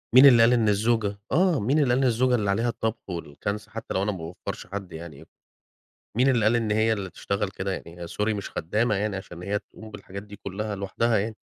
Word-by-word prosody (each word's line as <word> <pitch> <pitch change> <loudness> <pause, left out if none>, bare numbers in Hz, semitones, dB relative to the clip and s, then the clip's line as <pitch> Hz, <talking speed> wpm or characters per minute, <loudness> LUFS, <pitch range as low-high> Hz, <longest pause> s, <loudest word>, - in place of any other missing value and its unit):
مين 130 - +10
اللي 120 -4 +8
قال 120 +2 +6
إن 115 -3 +3
الزوجة 105 -1 +1
آه، 180 -3 +3
مين 130 +9 +2
اللي 140 -4 +3
قال - - +3
إن - - +4
الزوجة 125 +1 +3
اللي 105 -4 0
عليها 115 +4 +1
الطبخ 115 -2 -3
والكنس 90 +5 -4
حتى - - -6
لو 95 - +1
أنا 105 - +1
ما 95 - -5
باوّفرش 85 +1 -7
حد 95 0 -6
يعني؟ 80 -3 -9 0.9
مين 130 +2 +5
اللي 120 -5 +3
قال 110 +2 +4
إن 110 -2 0
هي 110 +1 +3
اللي 95 -3 -4
تشتغل 100 +1 -2
كده 95 0 -4
يعني 85 -1 -7
هي 85 - -5
sorry 105 +5 -1
مش 100 - -5
خدامة 105 +7 0
يعني 100 0 -1
عشان 90 -2 -8
هي 100 +1 -1
تقوم 110 +1 -13
بالحاجات 100 -1 -8
دي 105 0 -11
كلها 105 +2 -4
لوحدها 105 +4 0
يعني. 110 +2 -2
105 Hz, 230 wpm, -26 LUFS, 95-115 Hz, 0.9 s, مين